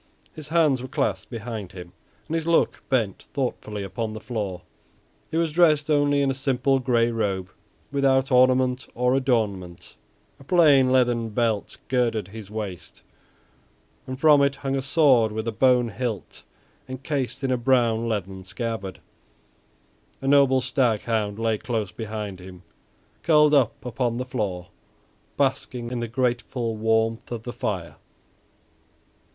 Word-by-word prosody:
His 155 -2 -8
hands 155 -5 +2
were 130 - -6
clasped 145 0 -2
behind 110 -5 -6
him, 90 -1 -10 0.3
and - - -5
his 165 0 -1
look 170 - +2
bent 115 -7 -1
thoughtfully 115 -6 -3
upon 110 +3 -4
the 110 - -6
floor. 100 -7 -4 0.7
He 160 - -2
was 165 -1 +1
dressed 155 -3 +3
only 145 -1 +3
in 135 - +2
a - - -1
simple 135 0 +1
gray 120 -2 +2
robe 100 -5 -2 0.4
without 135 -1 +2
ornament 130 0 +3
or 125 +1 +2
adornment, 105 -10 -1 0.4
a - - -14
plain 140 -5 +5
leathern 120 -3 +2
belt 110 -1 -1
girded 115 -6 0
his 105 -1 -10
waist, 105 -5 -7 1.0
and 130 0 -6
from 150 -1 +6
it 140 0 +2
hung 135 -1 -3
a 135 - -1
sword 135 -6 +4
with 110 +1 -4
a - - 0
bone 125 +1 +3
hilt 110 -1 -5 0.5
encased 135 0 -3
in 135 - 0
a - - +3
brown 120 -2 +2
leathern 95 -3 -4
scabbard. 105 -1 -5 1.2
A 135 - -5
noble 135 -2 +5
stag 125 -4 +1
hound 105 -3 -1
lay 115 -1 0
close 110 -5 -3
behind 105 -3 -6
him, 90 0 -12 0.6
curled 150 -2 +4
up 130 -5 +2
upon 120 -1 -1
the 125 - -3
floor, 100 -8 -3 0.7
basking 125 -3 -1
in 125 - -2
the 120 - -3
grateful 120 -1 -1
warmth 110 +1 0
of 115 -2 -5
the 120 - -6
fire. 100 -9 -4
120 Hz, 145 wpm, -24 LUFS, 110-135 Hz, 1.2 s, from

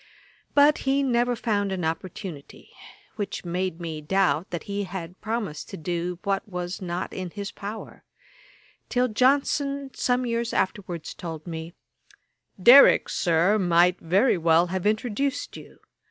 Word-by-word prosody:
But 290 +1 +5
he 280 +1 +2
never 245 -1 +1
found 205 -4 -1
an 185 -3 -2
opportunity; 160 -2 -6 0.5
which 200 -3 -4
made 180 0 -2
me 160 -3 -5
doubt 175 0 +1
that 175 - -5
he 200 0 -3
had 180 -1 -8
promised 215 -9 -4
to - - -7
do 175 +2 -3
what 195 +1 -1
was 180 0 -5
not 180 0 -4
in 185 -1 -5
his 200 +2 -6
power; 210 +2 -8 0.9
till 250 0 +2
Johnson 275 +3 +1
some 250 0 0
years 235 0 -2
afterwards 185 -4 -2
told 160 -3 -7
me, 165 0 -7 0.8
'Derrick, 245 +9 +8
Sir, 175 +5 +2
might 175 0 +3
very 190 +5 +2
well 165 +1 +4
have 190 +1 -1
introduced 250 +6 -1
you. - - -12
190 Hz, 140 wpm, -25 LUFS, 175-235 Hz, 0.9 s, Derrick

